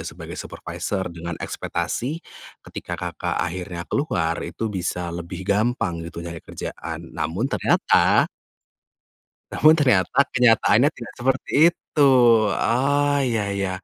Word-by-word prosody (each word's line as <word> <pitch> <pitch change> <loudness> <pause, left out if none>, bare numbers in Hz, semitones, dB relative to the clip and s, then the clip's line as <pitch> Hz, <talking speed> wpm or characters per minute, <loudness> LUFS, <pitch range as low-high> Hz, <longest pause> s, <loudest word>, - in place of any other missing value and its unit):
sebagai - - -9
supervisor 95 -2 -5
dengan 85 0 -6
ekspektasi, 150 +7 -4 0.4
ketika - - -6
Kakak - - -4
akhirnya 85 0 -3
keluar 85 - -1
itu 105 +5 -4
bisa 90 -2 -3
lebih 85 +2 -6
gampang 105 -3 0
gitu 85 +1 -7
nyari 85 -1 -7
kerjaan, 80 +1 -7
namun 85 +7 -2
ternyata 135 - +3 1.2
namun 155 +2 +5
ternyata, 130 - +2
kenyataannya 125 +2 +4
tidak 120 - -9
seperti 135 +2 -1 0.2
itu. 145 -4 +1 0.5
Oh, 145 +4 +1
iya 115 -4 0
iya. 95 -1 -1
100 Hz, 115 wpm, -23 LUFS, 85-130 Hz, 1.2 s, namun